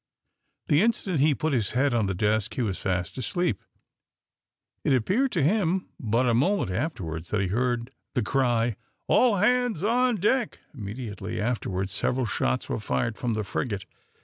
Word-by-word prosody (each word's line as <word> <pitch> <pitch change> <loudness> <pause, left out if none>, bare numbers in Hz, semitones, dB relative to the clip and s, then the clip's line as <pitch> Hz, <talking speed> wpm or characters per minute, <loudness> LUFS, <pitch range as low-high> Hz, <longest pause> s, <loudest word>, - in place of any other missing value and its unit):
The 150 +3 +4
instant 200 -7 +1
he 150 +1 +4
put 155 +1 -1
his 115 -7 +1
head 135 0 +3
on 110 -4 +2
the 95 - -1
desk 105 +2 0
he 125 - 0
was 95 -6 -2
fast 90 +3 -2
asleep. 175 - -1 1.2
It - - +3
appeared 200 - +2
to 165 - +2
him 185 +2 +1
but 120 +2 +1
a 120 - +3
moment 145 - +2
afterwards 90 - -3
that 105 - 0
he 95 -2 0
heard 120 +3 0 0.2
the 125 - +2
cry, 120 -4 +1 0.3
"All 245 -4 +4
hands 240 -2 +2
on 245 +3 +3
deck." 215 +5 +1 0.2
Immediately 110 -2 -5
afterwards 100 -4 -2
several 125 +4 0
shots 65 - -1
were - - -2
fired 65 - -1
from 120 -2 -2
the 110 - -1
frigate. 100 -1 -3
125 Hz, 165 wpm, -26 LUFS, 105-175 Hz, 1.2 s, The